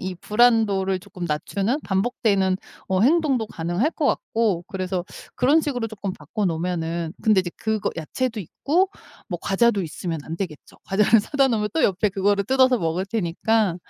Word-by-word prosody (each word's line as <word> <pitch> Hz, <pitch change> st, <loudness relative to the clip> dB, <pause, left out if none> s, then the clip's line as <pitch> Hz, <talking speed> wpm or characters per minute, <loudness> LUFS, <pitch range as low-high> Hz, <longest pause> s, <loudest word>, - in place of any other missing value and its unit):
이 185 Hz, 0 st, -4 dB
불안도를 210 Hz, -3 st, +2 dB
쪼끔 180 Hz, -1 st, -8 dB
낮추는 200 Hz, -, -1 dB
반복되는 195 Hz, -2 st, +1 dB, 0.3 s
어 185 Hz, -1 st, +1 dB
행동도 275 Hz, -4 st, +3 dB
가능할 175 Hz, -, -1 dB
것 300 Hz, -, -1 dB
같고 215 Hz, -9 st, 0 dB
그래서 185 Hz, -2 st, -3 dB, 0.3 s
그런 285 Hz, +6 st, +4 dB
식으로 250 Hz, -6 st, -2 dB
쪼끔 205 Hz, -3 st, -5 dB
바꿔 195 Hz, +8 st, -4 dB
놓으면은 165 Hz, -1 st, -2 dB
근데 215 Hz, -3 st, +4 dB
이제 180 Hz, -1 st, -5 dB
그거 220 Hz, -2 st, -1 dB
야채도 220 Hz, +8 st, -2 dB
있고 315 Hz, -, 0 dB, 0.4 s
뭐 175 Hz, -, -3 dB
과자도 205 Hz, +1 st, +2 dB
있으면 165 Hz, 0 st, -4 dB
안 165 Hz, -, -5 dB
되겠죠. 170 Hz, -5 st, -7 dB
과자를 210 Hz, +3 st, +4 dB
사다 275 Hz, +6 st, +2 dB
놓으면 215 Hz, -4 st, 0 dB
또 325 Hz, -, +3 dB
옆에 200 Hz, +2 st, +2 dB
그거를 200 Hz, +1 st, +1 dB
뜯어서 260 Hz, +1 st, +4 dB
먹을 170 Hz, +1 st, -1 dB
테니까 200 Hz, 0 st, 0 dB
200 Hz, 365 characters per minute, -23 LUFS, 180-230 Hz, 0.4 s, 그런